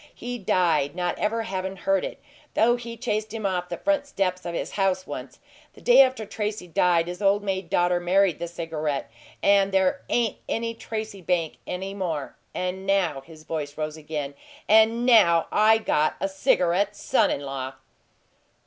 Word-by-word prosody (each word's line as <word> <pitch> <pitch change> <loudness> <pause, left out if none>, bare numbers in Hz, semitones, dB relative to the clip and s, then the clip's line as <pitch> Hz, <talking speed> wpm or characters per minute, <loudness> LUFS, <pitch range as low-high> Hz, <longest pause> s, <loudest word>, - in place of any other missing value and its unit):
He 245 0 -5
died, 170 -6 +1
not 180 -1 -1
ever 225 +2 0
havin' 190 -2 -4
heard 195 0 0
it, - - -5 0.4
though 240 +2 +4
he 235 -1 -7
chased 215 -3 -2
him 220 -2 -4
off 180 -2 -1
the 175 - -4
front 295 -1 0
steps 185 -8 -2
of 170 - -4
his - - -3
house 190 -2 0
once. 130 -2 -7 0.4
The - - -16
day 245 +2 +7
after 260 -4 +2
Tracy 210 -2 -4
died 170 0 +2
his 180 +2 -6
old 200 +1 +3
maid 190 -3 -3
daughter 175 -1 +2
married 180 -1 +2
the 170 - -3
cigarette 155 -6 -3 0.3
and 200 -1 +4
there 190 +7 +2
AIN'T 235 -3 +1
any 230 0 -1
Tracy 220 -3 -6
bank 170 -3 -1
any 190 +2 -4
more! 165 -8 -3 0.2
And 185 +1 -3
now" 180 -8 +1
his 155 0 -14
voice 150 -3 -5
rose 155 0 -3
again 150 -2 -5 0.3
"and 220 +2 +5
now 185 -9 +5
I 215 +1 +5
got 155 -8 +1
a - - 0
cigarette 190 +1 +1
son - - +2
in - - -2
law!" 135 -1 -5
190 Hz, 175 wpm, -25 LUFS, 170-215 Hz, 0.4 s, day